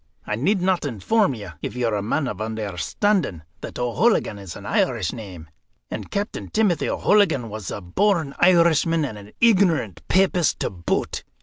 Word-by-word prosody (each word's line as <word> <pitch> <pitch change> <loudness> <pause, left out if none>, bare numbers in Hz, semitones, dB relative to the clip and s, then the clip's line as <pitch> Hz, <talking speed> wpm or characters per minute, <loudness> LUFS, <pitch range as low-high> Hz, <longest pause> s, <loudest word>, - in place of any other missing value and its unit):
I 105 - -2
need 180 - +1
not 185 -1 +1
inform 145 - +1
you, 100 -5 -8
if - - -5
you're 120 -3 0
a 105 - 0
man 130 +7 -1
of 105 -4 -5
understanding, 110 - -1 0.2
that - - -8
O'Hooligan 125 - +1
is 95 -4 -8
an - - -10
Irish 85 - 0
name, 95 -9 -9 0.4
and - - -5
Captain 205 +2 -4
Timothy 210 -6 +1
O'Hooligan 160 - +2
was 105 -1 -6
a - - -5
born 155 - +1
Irishman 165 -3 +4
and 125 - -5
an 100 +1 -14
ignorant 185 - +3
papist 185 -3 +2
to - - -1
boot. 85 -3 -2
140 Hz, 165 wpm, -23 LUFS, -, 0.4 s, Irishman